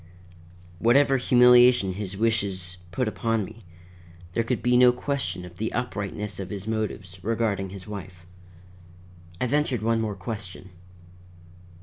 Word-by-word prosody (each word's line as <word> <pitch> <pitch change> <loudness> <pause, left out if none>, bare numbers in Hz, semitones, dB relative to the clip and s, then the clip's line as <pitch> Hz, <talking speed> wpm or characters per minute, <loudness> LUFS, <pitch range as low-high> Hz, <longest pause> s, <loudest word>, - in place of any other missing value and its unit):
Whatever 135 +5 +4
humiliation 125 -4 +5
his 100 0 -5
wishes 100 -5 -1
put 125 +7 -1
upon 115 -1 -1
me, 110 +3 -13 0.7
there 115 - 0
could 115 0 -2
be 125 +1 +3
no 125 0 +7
question 125 -9 -3
of 90 -1 -13
the 110 - -2
uprightness 105 -3 -3
of 95 -1 -5
his 100 -1 -5
motives 105 -5 -4
regarding 105 -4 -1
his 95 -1 -9
wife. 95 -4 -9 1.1
I - - 0
ventured 130 -3 0
one 115 0 +2
more 105 -2 -2
question. 95 -2 -7
110 Hz, 130 wpm, -25 LUFS, 95-120 Hz, 1.1 s, no